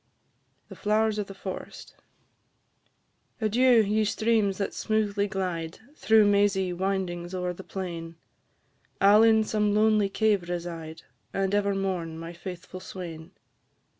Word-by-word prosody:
THE - - -11
FLOWERS 215 0 +1
OF 205 - -3
THE 195 - -10
FOREST. 190 -1 -8 1.4
Adieu! 235 +1 +4
ye 215 +2 +1
streams 210 -2 +1
that 200 - -2
smoothly 210 -2 0
glide, 175 -4 -3 0.2
Through 220 -6 +4
mazy 200 -2 +2
windings 180 -1 -2
o'er 180 -1 -2
the 190 - -10
plain; 170 -4 -6 0.8
I 200 +1 +6
'll 210 - +7
in 220 -1 +5
some 210 -1 0
lonely 215 -1 +3
cave 200 -4 +1
reside, 165 -2 -6 0.3
And 195 0 0
ever 200 -1 +1
mourn 180 -4 -2
my 165 +1 -7
faithful 180 +1 -8
swain. 175 -2 -8
195 Hz, 130 wpm, -27 LUFS, 175-210 Hz, 1.4 s, ll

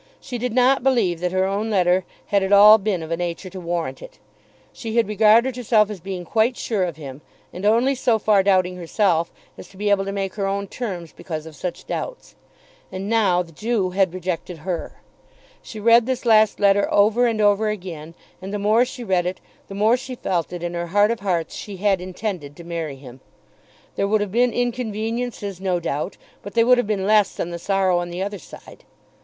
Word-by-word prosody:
She 245 - -6
did 250 +1 -2
not 255 +2 +4
believe 235 -10 +1
that 180 0 -1
her 185 0 +1
own 200 +3 -2
letter 185 -2 +2 0.2
had 200 -1 +1
at 190 +1 -2
all 210 +2 +8
been 195 -4 -2
of 160 - -8
a 165 - 0
nature 175 +2 -4
to 190 - -7
warrant 170 -6 -3
it. - - -12 0.6
She 225 -1 -6
had 230 - +3
regarded 220 +4 +4
herself 215 -4 +2
as 205 - -7
being 180 0 -6
quite 225 +7 +1
sure 210 -5 -1
of 170 -4 -5
him, 140 -2 -9 0.3
and 190 +3 -2
only 235 +5 +3
so 245 -3 +1
far 210 -2 +3
doubting 185 -2 +2
herself, 170 -1 0 0.3
as - - -10
to 190 - -18
be 205 +1 0
able 195 -1 +3
to 195 - -3
make 195 -1 -3
her 200 -2 -2
own 200 +1 -2
terms 185 -7 -6
because 155 -3 -6
of 160 -1 -11
such 180 +2 -6
doubts. - - -6 0.6
And 195 +2 -5
now 200 -6 +2
the 165 - -16
Jew 210 +1 -1
had 185 -1 +1
rejected 180 -1 -4
her! 180 -3 -4 0.6
She 220 - -9
read 230 +2 +5
this 255 -1 -2
last 220 -2 +4
letter 200 0 +3
over 220 +4 +4
and 225 -2 -1
over 210 +1 +3
again, 170 -6 -7 0.3
and 190 +1 -7
the 205 - -2
more 215 +4 +3
she 250 0 -8
read 185 -4 +1
it 185 +1 -4 0.3
the 195 - -8
more 215 +4 +3
she 255 0 -7
felt 175 -8 -1
that 175 -1 -7
in 175 0 -3
her 170 0 -3
heart 205 +5 +3
of 235 - -3
hearts 180 -5 -2
she 200 -2 -7
had 195 -1 +1
intended 180 -5 -5
to 170 - -11
marry 165 -4 -4
him. 130 -1 -13 0.8
There 200 - 0
would 215 +1 +2
have 205 -2 -3
been 245 +3 +2
inconveniences 225 -4 -3
no 185 -2 0
doubt, 165 +2 -3 0.2
but 200 - -10
they 230 - +5
would 250 +1 +5
have 245 - -1
been 200 -3 -1
less 210 -1 +3
than 175 - -4
the 170 - -5
sorrow 190 -1 +1
on 175 0 -4
the 175 +2 -4
other 205 0 -5
side. - - -14
200 Hz, 215 wpm, -22 LUFS, 180-220 Hz, 0.8 s, all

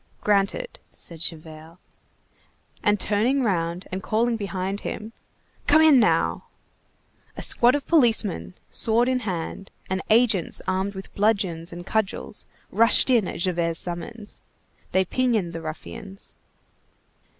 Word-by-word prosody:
"Granted," 210 - 0
said 165 -2 -5
Javert. 160 0 -7 1.0
And 205 -1 +2
turning 235 +8 +1
round 175 -4 -1
and 185 +1 -3
calling 230 +4 +1
behind 195 -1 -3
him:— 220 +1 -6 0.5
"Come 310 +2 +6
in 300 -5 +7
now!" 220 - +2 0.9
A - - -3
squad 245 +3 +4
of 290 - -3
policemen, 220 - +2 0.2
sword 230 +2 +2
in 255 0 +1
hand, 190 -2 -5 0.2
and 190 0 0
agents 220 -5 +3
armed 190 +2 -1
with 190 - -9
bludgeons 195 -6 0
and 175 +1 -8
cudgels, 215 0 -2 0.2
rushed 230 +3 +5
in 230 -7 +3
at - - -5
Javert's 170 -2 0
summons. 205 +5 -7 0.5
They 190 0 +2
pinioned 220 -6 0
the 165 - -5
ruffians. 195 +5 -9
200 Hz, 125 wpm, -24 LUFS, 175-230 Hz, 1.0 s, in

